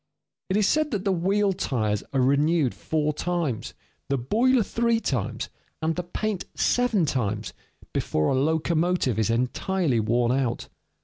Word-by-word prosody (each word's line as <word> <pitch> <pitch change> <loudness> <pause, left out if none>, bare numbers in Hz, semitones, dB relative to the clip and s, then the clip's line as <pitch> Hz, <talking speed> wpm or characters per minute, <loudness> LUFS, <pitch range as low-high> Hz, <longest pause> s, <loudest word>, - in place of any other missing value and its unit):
It 190 - +2
is 210 -2 +3
said 310 +4 +2
that 210 -5 -3
the 195 - +2
wheel 195 +3 +2
tires 110 - -1
are 135 - +1
renewed 140 +1 +2
four 150 -1 -1
times, 160 - -2 0.3
the 140 - +1
boiler 230 - +2
three 230 +2 +1
times, - - -2 0.3
and 160 0 0
the 180 - -1
paint 190 +2 -3
seven 240 -8 +2
times, 110 -6 -2 0.4
before 75 0 0
a - - +2
locomotive 160 - +1
is 110 - +1
entirely 130 +4 0
worn 120 +2 +1
out. 130 -2 -1
160 Hz, 145 wpm, -25 LUFS, 125-195 Hz, 0.4 s, is